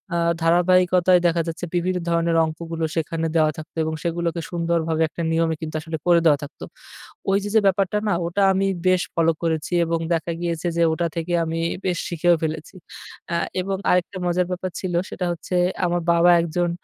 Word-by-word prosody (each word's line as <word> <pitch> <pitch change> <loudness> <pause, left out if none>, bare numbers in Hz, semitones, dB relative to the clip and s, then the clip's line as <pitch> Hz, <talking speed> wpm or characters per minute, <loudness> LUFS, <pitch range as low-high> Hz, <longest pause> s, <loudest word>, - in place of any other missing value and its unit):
আ - - +1 0.2
ধারাবাহিকতায় 180 +1 +4
দেখা 170 0 +1
যাচ্ছে 165 +2 -4
বিভিন্ন 180 +1 0
ধরনের 170 0 +1
অংকগুলো 165 +1 -5
সেখানে 165 0 -1
দেওয়া 155 -1 +4
থাকতো। 155 0 -10
এবং 160 - -2
সেগুলোকে 170 0 -2
সুন্দরভাবে 165 -1 0
একটা 170 - -7
নিয়মে 165 0 +1
কিন্তু 160 0 -5
আসলে 160 0 -5
করে 175 -1 +6
দেওয়া 150 -3 +5
থাকতো। 145 - -10 0.7
ওই 195 - +4
যে, 205 - -3
যে, - - +8
ব্যাপারটা 195 +1 +1
না 205 - +2
ওটা 175 +4 -1
আমি 195 +1 +1 0.2
বেশ 185 -1 +4
ফলো 165 0 +3
করেছি। 160 -1 -1
এবং 165 0 -1
দেখা 165 +1 -1
গিয়েছে 170 0 -2
যে - - +2
ওটা 170 +1 0
থেকে 170 +1 -3
আমি 165 0 -3 0.3
বেশ 180 -2 0
শিখেও 175 +1 +3
ফেলেছি। 160 +3 -4 0.6
আ - - +1 0.3
এবং 195 +1 -2
আরেকটা 180 +2 +1
মজার 180 +1 +1
ব্যাপার 185 0 -3
ছিল 185 -2 -4 0.2
সেটা 180 - -4
হচ্ছে 175 +2 -5 0.3
আমার 175 0 0
বাবা 170 +1 +4
একজন 170 +1 -1
170 Hz, 180 wpm, -22 LUFS, 165-180 Hz, 0.7 s, যে